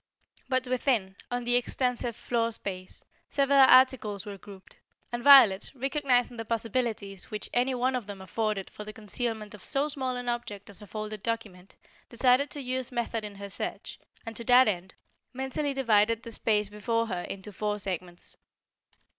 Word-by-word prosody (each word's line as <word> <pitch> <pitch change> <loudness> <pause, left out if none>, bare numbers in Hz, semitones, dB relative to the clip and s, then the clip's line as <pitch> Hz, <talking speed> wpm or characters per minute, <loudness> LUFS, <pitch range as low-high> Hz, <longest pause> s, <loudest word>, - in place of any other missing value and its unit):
But 255 -1 +1
within, 245 -6 0
on 245 0 -2
the 245 0 +2
extensive 245 -1 0
floor 230 0 -1
space, 185 -4 -5 0.2
several 280 0 +3
articles 255 -6 +5
were 205 -1 -6
grouped, 195 -1 -13 0.3
and 240 0 -4
Violet, 255 -9 +7
recognizing 260 -2 +1
the 225 - -3
possibilities 225 -3 -3
which 210 -1 -5
any 250 +2 +2
one 255 +1 +1
of 240 -5 -4
them 200 -1 -7
afforded 205 +1 -2
for 210 - -8
the 215 0 -8
concealment 220 0 -3
of 210 - -12
so 280 +2 0
small 260 -3 -3
an 245 0 -5
object 210 -4 -4
as 200 - -7
a 210 - -11
folded 215 0 -5
document, 205 -5 -5 0.3
decided 255 +3 +3
to 290 - -6
use 255 0 -3
method 235 -2 -2
in 205 -1 -6
her 200 0 -8
search, - - -5 0.3
and 225 0 -6
to 235 - -6
that 250 +1 +7
end, 185 -2 -2 0.4
mentally 265 +3 -2
divided 230 -4 +2
the 230 - -8
space 210 -1 +1
before 230 +3 -1
her 180 -5 -3
into 195 +3 -8
four 210 +1 -2
segments. 180 -3 -6
230 Hz, 170 wpm, -28 LUFS, 205-250 Hz, 0.4 s, Violet